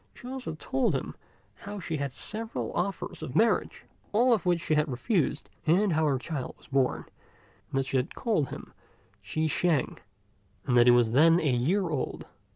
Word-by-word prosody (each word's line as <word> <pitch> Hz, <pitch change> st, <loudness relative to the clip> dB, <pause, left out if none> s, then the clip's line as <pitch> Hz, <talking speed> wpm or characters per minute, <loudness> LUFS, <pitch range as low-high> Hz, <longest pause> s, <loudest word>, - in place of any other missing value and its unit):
She 245 Hz, -, -10 dB
also 255 Hz, -11 st, -5 dB
told 135 Hz, -3 st, 0 dB
him -, -, -3 dB, 0.4 s
how 205 Hz, 0 st, -7 dB
she 165 Hz, -3 st, -3 dB
had 140 Hz, -, -1 dB
had 140 Hz, -, -5 dB
several 220 Hz, -, -5 dB
offers 190 Hz, +2 st, -3 dB
of 125 Hz, -, -6 dB
marriage, 230 Hz, +1 st, +1 dB, 0.3 s
all 240 Hz, +4 st, +4 dB
of 210 Hz, -5 st, 0 dB
which 175 Hz, -1 st, +3 dB
she 160 Hz, -, -1 dB
had 150 Hz, 0 st, +2 dB
refused, 150 Hz, -, -1 dB, 0.2 s
and 185 Hz, +3 st, +3 dB
how 155 Hz, 0 st, +2 dB
her 140 Hz, -2 st, +2 dB
child 135 Hz, -1 st, -5 dB
was -, -, -20 dB
born, 135 Hz, -2 st, +1 dB, 0.6 s
and -, -, -3 dB
that 135 Hz, -, +1 dB
she 135 Hz, -, 0 dB
had 125 Hz, -, -2 dB
called 205 Hz, -, 0 dB
him -, -, -9 dB, 0.5 s
Chi 130 Hz, +10 st, -2 dB
shêng, 155 Hz, -2 st, +1 dB, 0.7 s
and 125 Hz, -, +1 dB
that 120 Hz, 0 st, +6 dB
he -, -, +9 dB
was 120 Hz, -2 st, +4 dB
then 165 Hz, +7 st, +5 dB
a 160 Hz, -, 0 dB
year 170 Hz, +11 st, +1 dB
old. 150 Hz, -5 st, -3 dB
155 Hz, 190 wpm, -28 LUFS, 135-195 Hz, 0.7 s, he